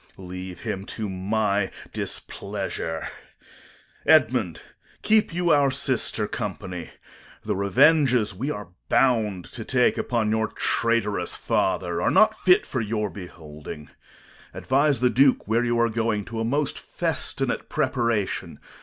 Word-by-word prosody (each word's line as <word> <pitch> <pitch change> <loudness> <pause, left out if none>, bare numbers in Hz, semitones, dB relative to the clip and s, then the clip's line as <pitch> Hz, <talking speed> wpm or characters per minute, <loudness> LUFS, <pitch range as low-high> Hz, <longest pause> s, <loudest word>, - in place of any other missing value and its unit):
Corn. 95 -2 -11
Leave 90 0 -7
him 105 -4 -4
to 105 +1 -4
my 100 +1 0 0.2
displeasure. 80 -1 -3 1.0
Edmund, - - +3 0.4
keep 215 -2 +3
you 175 0 +1
our 145 -2 +4
sister 130 -5 +2
company. 95 -6 -5 0.5
The - - -2
revenges 125 - +3
we 125 +10 -4
are 105 -11 -5 0.2
bound 110 -8 +2
to 115 - -6
take 125 +1 +2
upon 115 -3 0
your 110 0 +1
traitorous 115 -3 0
father 85 -2 -1
are - - +2
not 215 0 +4
fit 180 -4 +3
for 130 - -3
your 105 -2 -2
beholding. 75 -5 -10 0.6
Advise 140 -1 +1
the 125 -1 +3
Duke 135 0 +3
where 115 +3 +2
you 120 -1 0
are 115 - +4
going, 110 -2 -1
to 115 -1 -6
a - - 0
most 140 +5 0
festinate - - -2
preparation. 115 -5 -1
110 Hz, 130 wpm, -24 LUFS, 95-130 Hz, 1.0 s, our